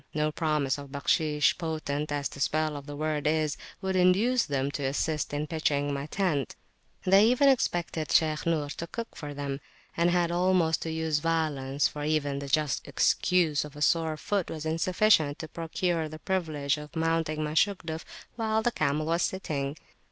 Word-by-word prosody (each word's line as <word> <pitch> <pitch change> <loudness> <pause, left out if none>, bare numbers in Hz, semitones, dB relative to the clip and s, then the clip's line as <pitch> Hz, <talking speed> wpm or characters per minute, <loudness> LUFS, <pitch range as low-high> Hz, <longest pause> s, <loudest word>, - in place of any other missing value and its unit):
No 155 0 +1
promise 150 -4 0
of 140 -1 -10
"Bakhshish," 150 +2 +1
potent 155 -3 -3
as 145 -1 -1
[p.249] - - -17
the - - -10
spell 155 +2 0
of 145 0 -8
that 145 - -6
word 150 -1 -1
is, 155 -1 +1 0.3
would 190 0 -1
induce 200 +8 +3
them 140 -1 -1
to 145 - -4
assist 150 +3 -1
in 145 +1 -2
pitching 145 -3 0
my 140 +1 -4
tent: 155 - -1 0.5
they 195 +3 +6
even 250 +4 +4
expected 175 - 0
Shaykh 155 0 +2
Nur 155 -3 0
to 170 +3 -5
cook 230 +6 -6
for 145 -2 -7
them, 140 -1 -4 0.3
and 170 +1 +3
I - - +1
had 175 -1 +2
almost 175 -2 +2
to 160 - -3
use 160 -1 0
violence, 150 -4 0
for 150 - -6
even 145 -2 0
the 140 - -6
just 150 0 0
excuse 170 -5 +2
of 150 -1 -10
a 150 - -9
sore 160 -2 +2
foot 195 +4 -1
was 155 -1 -5
insufficient 165 -1 +3
to 160 - -6
procure 165 0 -2
the 155 - -8
privilege 155 -5 -1
of 150 +2 -11
mounting 160 -1 0
my 150 0 -3
Shugduf 165 -2 0 0.3
while 220 -1 0
the 240 - +2
camel 155 -4 0
was 165 +2 +1
sitting. 150 -7 -2
155 Hz, 185 wpm, -28 LUFS, 145-170 Hz, 0.5 s, they